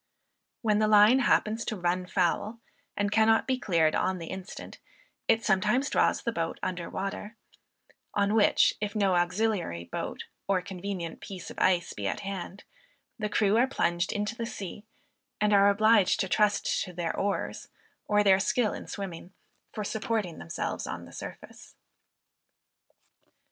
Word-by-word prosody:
When 210 -2 +2
the 215 - +3
line 215 +4 +6
happens 225 -3 +2
to 220 - -2
"run 180 0 -1
foul," 200 +5 0 0.4
and 205 0 0
cannot 225 +1 +4
be 260 -1 0
cleared 165 -8 +2
on 190 - 0
the 165 -2 -7
instant, 190 0 -8 0.5
it 225 +1 +2
sometimes 215 +7 +2
draws - - +2
the 235 - 0
boat 165 -6 -3
under 175 -2 -3
water; 205 +3 -5 0.8
on 200 0 +2
which, 220 -2 +4
if 210 0 -3
no 200 -3 +2
auxiliary 175 - 0
boat, - - -5 0.2
or 195 -2 +2
convenient 180 -2 -5
piece 185 -3 -8
of - - -9
ice, 175 -2 +2
be 100 -1 -4
at - - -3
hand, 195 0 -6 0.6
the 210 -1 -2
crew 210 0 +2
are 250 +3 +4
plunged 175 -9 0
into 210 +2 -2
the 230 0 -4
sea, 210 -1 -7 0.5
and 210 0 +2
are 200 0 +6
obliged 215 -1 +4
to 190 - -1
trust 210 +2 +1
to 180 - -9
their 170 -1 -2
oars 200 0 -2 0.4
or 210 0 +3
their 195 -1 +5
skill 215 +2 +1
in - - -8
swimming, 185 -2 -7 0.4
for 215 - -4
supporting 215 -4 -2
themselves 85 - -4
on - - -6
the - - -14
surface. - - -10
200 Hz, 155 wpm, -28 LUFS, 180-215 Hz, 0.8 s, line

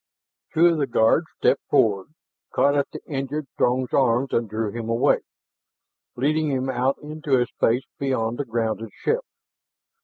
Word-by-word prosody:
Two 165 +2 +4
of 170 -2 +4
the 140 - +1
guards 120 +7 +3
stepped - - +2
forward, 100 -3 +2 0.5
caught 140 +1 +3
at 140 -1 +1
the - - -9
injured 140 +1 -3
Throg's 125 0 +1
arms 130 0 +2
and 115 -2 0
drew 110 0 -2
him 115 0 -5
away, 115 +1 +3 1.0
leading 155 +4 +1
him 130 -1 -1
out 130 +2 0
into 150 -3 0
a 120 - +2
space 120 +2 0 0.2
beyond 120 -3 -1
the 145 - -1
grounded 115 -1 -2
ship. 480 +2 -1
130 Hz, 155 wpm, -24 LUFS, 115-145 Hz, 1.0 s, Two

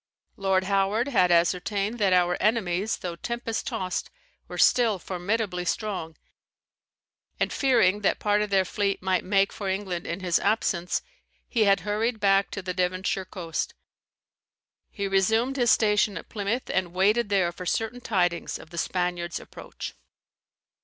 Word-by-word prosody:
Lord 190 -1 +1
Howard 200 +6 +1
had 185 -9 +3
ascertained 195 +6 +1
that 200 -3 +3
our 180 -1 +3
enemies, 210 -2 +1
though 175 -2 -5
tempest 235 +2 -3
tost, 185 -7 -3 0.4
were - - -7
still 230 -5 +4
formidably 185 +1 -2
strong; 180 -3 -3 1.2
and - - 0
fearing 225 -7 +3
that 200 - +2
part 210 0 +1
of 210 - -1
their 195 -1 +3
fleet 200 0 -1
might 185 -1 +1
make 195 +1 +2
for 200 -2 -4
England 190 -3 -3
in 170 +3 -4
his 175 -2 +2
absence, 180 -5 0 0.4
he 225 -3 +2
had 195 0 +4
hurried 215 +3 -1
back 195 -1 +3
to 200 - -6
the 180 0 -3
Devonshire 185 +1 -1
coast. 170 -3 -4 1.1
He 200 -2 -3
resumed 220 +7 +2
his 245 -3 +2
station 210 -3 +3
at - - -9
Plymouth, 215 +4 -2
and 180 -2 -1
waited 210 +4 +3
there 190 -4 +2
for 180 +1 -8
certain 225 +6 -1
tidings 175 -7 0
of 160 - -14
the 170 - -4
Spaniard's 175 -1 -2
approach. - - -9
195 Hz, 150 wpm, -26 LUFS, 180-215 Hz, 1.2 s, still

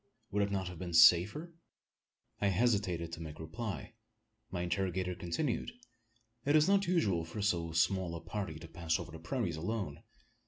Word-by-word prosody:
Would 105 - +1
it 100 0 +1
not 95 -2 -1
have 90 -2 -7
been 90 -2 -4
safer?" 95 - +6 0.9
I 100 - +2
hesitated 95 -5 +1
to 85 - -6
make 80 -2 -7
reply. 105 +6 -5 0.6
My 90 -1 -3
interrogator 90 0 -1
continued: 115 - -2 0.7
"It 145 +2 +3
is 155 +1 +6
not 200 -1 +3
usual 105 - +2
for 85 +5 -5
so 85 -4 +1
small 90 +1 +1
a - - -4
party 95 -2 -4
to 80 - -10
pass 80 0 -1
over - - -7
the 80 - -9
prairies 90 - -2
alone. 90 -3 -3
90 Hz, 165 wpm, -33 LUFS, 85-105 Hz, 0.9 s, safer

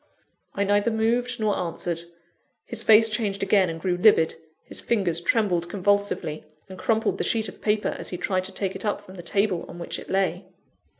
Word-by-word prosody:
I 200 - +1
neither 205 +2 +2
moved 235 +2 0
nor 215 -2 +1
answered. 170 -1 -3 0.6
His - - -1
face 220 +1 +6
changed 210 -3 -1
again, 195 -2 +3
and 165 0 -5
grew 180 +1 0
livid; 180 -4 +5 0.3
his - - -6
fingers 185 -7 0
trembled 180 -5 +1
convulsively, 200 -5 0 0.2
and 185 -1 -10
crumpled 225 -1 +1
the - - +1
sheet 220 -1 0
of - - -11
paper, 210 0 +1
as - - -5
he 180 - -4
tried 185 0 -1
to 190 - -4
take 190 0 -2
it - - -4
up 205 -1 -1
from 185 - -13
the 185 - -8
table 195 0 0
on - - -10
which 170 - -5
it - - -11
lay. 190 -1 0
195 Hz, 195 wpm, -25 LUFS, 180-215 Hz, 0.6 s, face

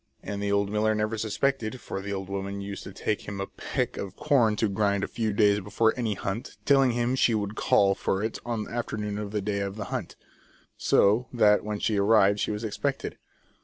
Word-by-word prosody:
And 100 0 -4
the 100 0 -1
old 100 0 +1
miller 110 +1 +2
never 105 +1 0
suspected, 110 +3 -1
for 95 - -5
the 100 +1 -5
old 95 -1 -4
woman 100 0 -4
used 100 0 -6
to - - -7
take 105 +2 -3
him 100 -1 -5
a 100 - -1
peck - - -3
of 95 -2 -5
corn 125 -8 +3
to 110 - +1
grind 100 0 +1
a - - -1
few 110 -2 -2
days 105 0 +4
before 110 +3 +1
any 115 -5 -1
hunt, 95 +5 -5
telling 135 -3 +4
him 120 +1 0
she 120 -3 +3
would 100 -1 -2
call 100 -2 +3
for 95 +1 -1
it 110 - -3
on 115 -3 -2
the - - -10
afternoon 105 -3 -3
of 105 -1 -4
the 105 0 -2
day 100 0 -1
of 100 0 -3
the 105 -2 -5
hunt. - - -4 0.6
So 110 +5 +3
that 105 -4 +4
when 105 0 -3
she 105 0 0
arrived 100 -1 +4
she - - 0
was 105 +1 -3
expected. 110 -2 -3
105 Hz, 220 wpm, -27 LUFS, 100-110 Hz, 0.6 s, days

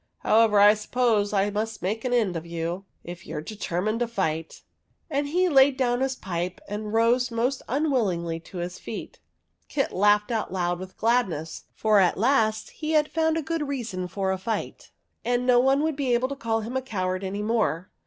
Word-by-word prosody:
However, 220 -2 +4
I 205 +1 +8
suppose 215 -1 +1
I 205 0 +1
must 215 +1 -3
make 215 +4 -2
an 255 - -2
end 220 -7 +2
of 165 - -3
you, 170 +3 -4 0.2
if 175 +2 -9
you - - -6
are 150 - -3
deter 180 -1 -4
mined 215 +2 0
to 240 - 0
fight." 165 -8 -3 0.5
And 285 0 0
he 360 +5 +2
laid 270 -4 +5
down 245 -1 +1
his 265 0 0
pipe 180 -4 -4
and 210 +1 -5
rose 235 +3 +3
most 245 +3 -1
unwillingly 215 - 0
to 180 +3 -11
his 175 +1 -5
feet. - - -7 0.5
Kit 275 -2 -1
laughed 210 +3 +3
out 220 -5 -2
loud 175 -1 -1
with 185 0 -9
gladness, 195 -10 0
for 215 -2 +3
at 180 -2 +3
last 220 -1 +1
he 310 0 -4
had 300 -1 +3
found 320 0 +1
a 325 - -2
good 315 -1 -2
reason 225 -10 -3
for 190 +1 -2
a 190 - -2
fight, 215 +2 -4 0.3
and 245 +1 0
no 250 -1 +5
one 270 +3 +3
would 315 -2 0
be 265 -4 +1
able 255 +2 0
to 280 - -4
call 225 -4 -1
him 230 +4 -6
a 260 - +1
coward 185 -6 -2
any 200 +2 -3
more. 210 -6 0
220 Hz, 205 wpm, -25 LUFS, 190-255 Hz, 0.5 s, I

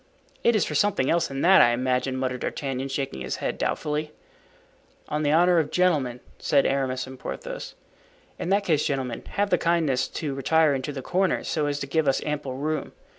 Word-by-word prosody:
"It 235 - +4
is 205 - +2
for - - -4
something 150 -4 +2
else 170 0 +2
than 135 0 -4
that, 190 +2 +7
I 120 - +5
imagine," 130 +1 0
muttered 130 -1 -2
D'Artagnan, 135 0 -3
shaking 135 - -3
his 65 -1 -3
head - - -3
doubtfully. 150 0 -2 1.0
"On 150 - -1
the 145 -1 +2
honor 175 +2 +5
of 150 -2 0
gentlemen," 145 -9 +1 0.2
said 140 -3 +2
Aramis 130 -2 0
and 130 0 -11
Porthos. - - -6 0.6
"In - - -3
that 200 +1 +3
case, 155 -5 +2
gentlemen, 130 -4 -2
have 205 0 0
the 180 - +3
kindness 165 -6 +1
to 150 -4 -4
retire 155 +3 +3
into 135 +1 -3
the 135 -2 -6
corners, 185 +5 0
so 150 -2 0
as 145 -1 -1
to - - -2
give 150 +2 0
us 135 - +3
ample 145 -3 -3
room. 155 +3 -3
145 Hz, 195 wpm, -25 LUFS, 130-165 Hz, 1.0 s, that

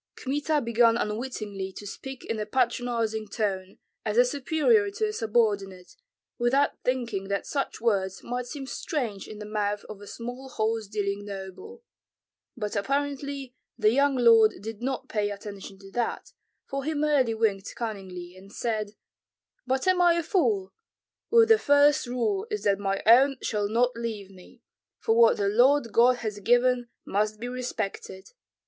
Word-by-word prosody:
Kmita 295 +3 0
began 235 -1 +3
unwittingly 210 -4 -4
to 205 - -9
speak 265 +6 -8
in 225 -1 -3
a 210 - -2
patronizing 235 -2 0
tone, 195 -3 -3 0.3
as 215 0 -2
a 245 - +7
superior 315 - +2
to 430 +1 -1
a - - -5
subordinate, 205 - -1 0.4
without 270 +4 +3
thinking 235 -6 -1
that 200 0 -2
such 280 -2 -3
words 195 -5 0
might 245 0 -4
seem 275 0 -6
strange 245 - -4
in 215 - -9
the 210 - -7
mouth 210 -1 -2
of 210 -2 -9
a 205 - -11
small 245 +4 -7
horse 220 -2 -1
dealing 200 -1 -2
noble; 200 - -8 0.7
but 210 -2 -3
apparently 280 +3 -2 0.2
the 215 -2 +4
young 280 +2 +3
lord 230 -3 +6
did 220 +2 -7
not 260 +1 -3
pay 210 -1 -1
attention 200 -1 -8
to 195 0 -14
that, 240 +1 -3 0.3
for 275 0 -4
he 310 +2 -2
merely 290 -6 +2
winked 205 -3 -1
cunningly 185 -6 -6
and 195 +1 -15
said, 215 -2 -3 0.7
"But 260 +5 0
am 370 -1 +4
I 345 -1 +5
a 340 - 0
fool? 385 +2 0 0.6
With 460 -1 +6
me 450 - +8
the 435 - +3
first 285 -1 +4
rule 385 - -1
is 425 -1 -3
that 200 -1 +2
my 195 -1 -1
own 260 +5 +6
shall 205 -2 -1
not 240 +3 +2
leave 220 -4 -5
me, 195 +6 -17 0.3
for 225 - +1
what 230 -1 +6
the 200 - 0
Lord 245 +4 +4
God 245 +3 +5
has 210 -1 -3
given 245 +2 +2 0.2
must 210 +1 -1
be 240 - -4
respected. 220 -6 -5
230 Hz, 165 wpm, -27 LUFS, 205-270 Hz, 0.7 s, me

